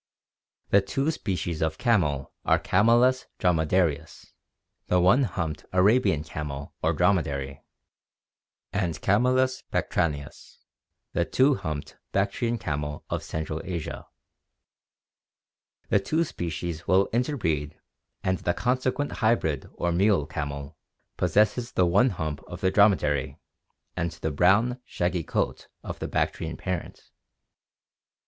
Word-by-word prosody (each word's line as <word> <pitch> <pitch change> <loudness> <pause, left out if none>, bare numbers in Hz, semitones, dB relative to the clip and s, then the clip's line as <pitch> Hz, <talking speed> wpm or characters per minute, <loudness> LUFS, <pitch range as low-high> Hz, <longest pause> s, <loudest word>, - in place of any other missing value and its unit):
The 100 - +6
two 135 +10 -1
species 90 - -3
of 80 0 0
camel 75 - +1
are - - +4
Camelus 120 +6 +3
dromcdarius, 80 -2 0 0.6
the 90 - +3
one 95 +10 +5
humped 80 -8 -4
Arabian 95 -4 +3
camel 75 -3 -6
or 80 - +2
dromedary, 75 -6 0 1.1
and 90 -5 0
C. - - -10
bactrianus, 110 - 0 0.6
the - - +2
two 135 +3 +3
humped 80 - -5 0.2
Bactrian 100 +4 0
camel 75 -6 -4
of - - -1
central 80 0 -4
Asia. 85 -4 -5 1.8
The 100 - +4
two 155 +11 0
species 85 - -5
will 95 +3 +4
interbreed 105 - -1 0.4
and 95 -1 0
the 85 - -1
consequent 130 +3 0
hybrid 80 - +1
or 85 - -1
mule 95 -3 +3
camel 70 +1 -5 0.4
possesses 110 +4 +1
the 90 - +3
one 105 +9 +4
hump 80 -6 -4
of 90 - -8
the 95 - +2
dromedary 85 -10 +3 0.6
and 85 - -1
the 80 0 -4
brown 105 - +3
shaggy 90 -4 -1
coat - - -2 0.2
of - - -6
the - - -3
Bactrian - - -2
parent. 90 -2 -4
90 Hz, 115 wpm, -26 LUFS, 80-110 Hz, 1.8 s, The